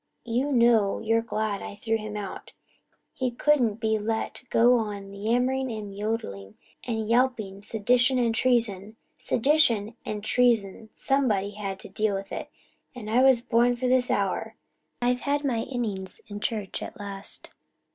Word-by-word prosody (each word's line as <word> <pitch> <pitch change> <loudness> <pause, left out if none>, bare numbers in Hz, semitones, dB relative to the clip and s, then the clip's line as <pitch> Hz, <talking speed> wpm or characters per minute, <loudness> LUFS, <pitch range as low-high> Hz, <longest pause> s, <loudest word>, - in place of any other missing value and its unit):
You 250 +5 0
know 235 -5 +4
you're 225 +1 +1
glad 215 -3 -2
I - - -7
threw 225 +2 -1
him 215 -1 -6
out 200 -2 -7 0.6
he 255 -1 -1
couldn't 245 -3 +2
be 220 -1 0
let 225 +3 -3
go 240 +1 +5
on 200 -2 -5
yammering 245 +5 0
and 210 -3 -6
yodelling 110 - -4 0.3
and 220 -2 -2
yawping 230 -5 +1
sedition 245 +5 +2
and 235 -2 +2
treason. 225 -4 +1 0.2
Sedition 235 -5 +2
and 210 -1 -5
treason 220 -2 +1
somebody 220 -8 0
had 200 -2 -5
to - - -8
deal 205 +1 0
with 195 0 -6
it. - - -5 0.5
I 225 +1 +1
was 260 -3 +5
born 240 +1 +3
for 250 +1 -2
this 250 0 +3
hour 195 -2 -1 0.5
I've 245 0 +2
had 285 +2 -1
my 245 -5 +1
innings 220 -7 -4
in 205 -2 -6
church 210 -3 -3
at - - -8
last. 200 -1 -5
225 Hz, 150 wpm, -26 LUFS, 205-245 Hz, 0.6 s, go